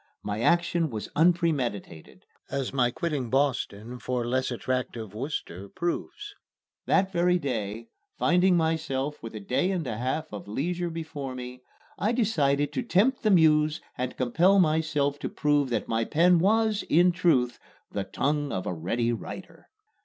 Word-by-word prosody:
My 105 0 -3
action 170 +2 +2
was 110 -4 -5
unpremeditated, 145 - 0 0.2
as 135 -2 -3
my 125 -3 +3
quitting 140 -2 -3
Boston 125 -4 -1
for 125 -1 -2
less 130 +2 0
attractive 120 -4 -3
Worcester 105 - -5
proves. 410 - -4 0.5
That 190 0 +3
very 180 0 +3
day, 115 - -4 0.3
finding 180 +1 +3
myself 150 -3 -1
with 115 -1 -8
a - - -4
day 125 - 0
and 180 -5 -1
a 115 -4 -3
half 130 +3 -2
of 100 - -7
leisure 170 - -2
before 155 -5 -6
me, 125 0 -8 0.4
I 215 +3 +1
decided 145 - +1
to - - -1
tempt 235 +3 +2
the 215 - +2
Muse 155 -4 +4 0.2
and 125 0 -4
compel 170 +11 +3
myself 155 -4 +1
to - - -3
prove 145 -2 +1
that 120 - -1
my 115 0 0
pen 170 +7 +4
was, 215 +3 +2
in 175 +3 +5
truth, 155 -9 +1 0.3
"the 100 - -2
tongue 145 +8 -1
of 90 - -3
a - - -2
ready 115 +9 -1
writer." 115 - -9
145 Hz, 155 wpm, -27 LUFS, 120-170 Hz, 0.5 s, in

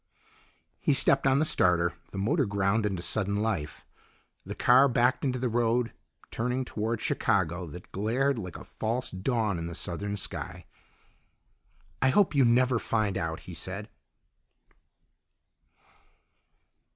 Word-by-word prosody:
He 145 - +2
stepped 135 0 +3
on 135 0 +4
the 155 - +2
starter; 90 - +2 0.2
the - - -7
motor 135 - +1
ground 100 +2 +1
into 95 -4 -3
sudden 100 0 -1
life. 100 -9 -2 0.6
The - - -7
car 130 +3 +6
backed 125 0 +2
into 130 -2 0
the 125 0 -1
road, 115 0 +1 0.4
turning 125 +3 -1
toward 115 0 -2
Chicago, 90 -2 0
that 90 +4 -11
glared 120 +6 0
like 90 -5 -6
a - - -10
false 115 +3 -2
dawn 105 -1 -1
in 85 - -4
the 85 - -6
southern 100 +5 -4
sky. - - -6 1.4
"I 130 - +4
hope 200 +5 +3
you 140 -2 +4
never 125 +1 +3
find 110 -4 0
out," 80 -1 -3
he 90 - -10
said. 95 +5 -6
110 Hz, 135 wpm, -28 LUFS, 95-125 Hz, 1.4 s, car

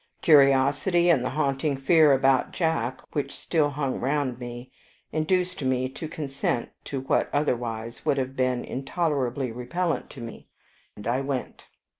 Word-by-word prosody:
Curiosity, 145 +4 +5
and 135 -7 +3
the 130 - -1
haunting 140 0 0
fear 155 +2 +5
about 135 -1 +3
Jack, 145 -8 -1
which 140 -2 -3
still 155 -4 +1
hung 140 -2 -2
round 135 -2 -1
me, 120 0 -8 0.4
induced 180 +3 0
me 130 0 +1
to 155 +4 -7
consent 135 -5 -2 0.2
to 135 -2 -4
what 135 - +1
otherwise 120 -5 -2
would 140 - +1
have 135 0 -2
been 130 -2 0
intolerably 135 -3 -1
repellent 165 +9 -2
to 135 - -11
me, 115 -1 -9 0.5
and 105 - -10
I 120 +4 +1
went. 135 -2 -4
135 Hz, 145 wpm, -26 LUFS, 125-150 Hz, 0.5 s, Curiosity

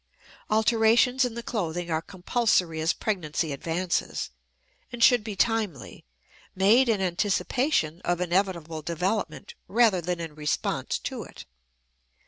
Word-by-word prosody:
Alterations 230 +4 +3
in 240 -2 -4
the 235 - -5
clothing 175 -7 -3
are 160 0 0
compulsory 180 -3 0
as 160 - +2
pregnancy 165 -6 -2
advances, 170 +5 -2 0.6
and 240 -1 -1
should 245 -3 +6
be 215 -2 -5
timely, 210 - -1 0.5
made 220 +7 +4
in 210 -4 +1
anticipation 190 - 0
of 175 0 0
inevitable 175 -3 -1
development 180 +6 -3
rather 220 -4 +3
than 175 +1 -3
in 165 -2 -6
response 150 -1 -2
to - - -5
it. - - -11
185 Hz, 120 wpm, -26 LUFS, 165-225 Hz, 0.6 s, should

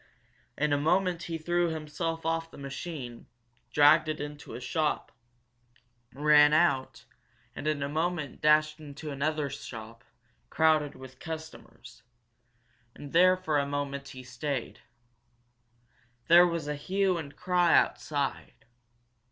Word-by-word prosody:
In 150 0 +1
a 145 - +2
moment 180 +3 +1
he 170 -1 -4
threw 175 +2 0
himself 165 +1 -4
off 165 0 -1
the - - -14
machine, 140 -3 -7 0.4
dragged 145 +1 +5
it 155 - -3
into 145 0 -7
a - - -6
shop, 155 +4 -1 1.0
ran 150 +1 +5
out, 130 -7 +1 0.5
and 150 - -5
in 150 -2 0
a - - -1
moment 160 -1 -2
dashed 155 0 +3
into 150 0 -8
another 150 +1 -1
shop, 115 -4 -9 0.5
crowded 155 -2 +2
with 130 -1 -13
customers. 160 -7 -9 0.9
And 145 - -10
there 185 +2 +6
for 160 -5 0
a 140 - -1
moment, 140 -1 -4
he 130 -1 -10
stayed. 125 +1 -4 1.5
There 175 +1 +8
was 170 -3 -3
a 150 - -1
hue 185 +4 0
and 145 -3 -8
cry 180 -2 +3
outside. 145 -3 -2
150 Hz, 125 wpm, -29 LUFS, 140-165 Hz, 1.5 s, There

